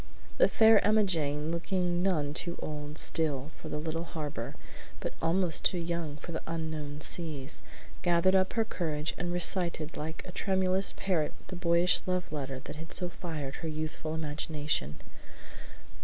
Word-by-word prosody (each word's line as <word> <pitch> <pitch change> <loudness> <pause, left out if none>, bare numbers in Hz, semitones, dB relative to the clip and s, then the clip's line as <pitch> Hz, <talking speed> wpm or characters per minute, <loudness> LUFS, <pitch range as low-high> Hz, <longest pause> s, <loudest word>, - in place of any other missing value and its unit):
The - - +7
Fair 220 -1 +6
Emmajane, 165 -8 +2
looking 175 +1 0
none 155 -7 +1
too 170 +2 -2
old 150 0 -5
still 150 -3 +5
for 155 - -9
the 150 - -3
"little 160 +2 -3
harbor," 145 -8 -5 0.4
but - - -4
almost 170 0 +2
too 180 - +2
young 170 -3 -3
for 170 - -8
the 160 - -4
"unknown 155 -3 -4
seas," 150 -6 -1 0.4
gathered 175 +1 +3
up 190 0 +3
her 225 -2 +1
courage 155 -6 -2
and 175 0 -2
recited 175 -3 +3
like 160 +2 -5
a - - -7
tremulous 190 0 +1
parrot 170 -6 0 0.2
the 185 - -5
boyish 175 0 +3
love 180 -1 -1
letter 135 -3 -3
that - - -8
had 160 +1 -8
so 180 -1 -1
fired 155 -6 -5
her 165 - -5
youthful 155 0 -4
imagination. 150 - -2
165 Hz, 155 wpm, -30 LUFS, 150-180 Hz, 0.4 s, The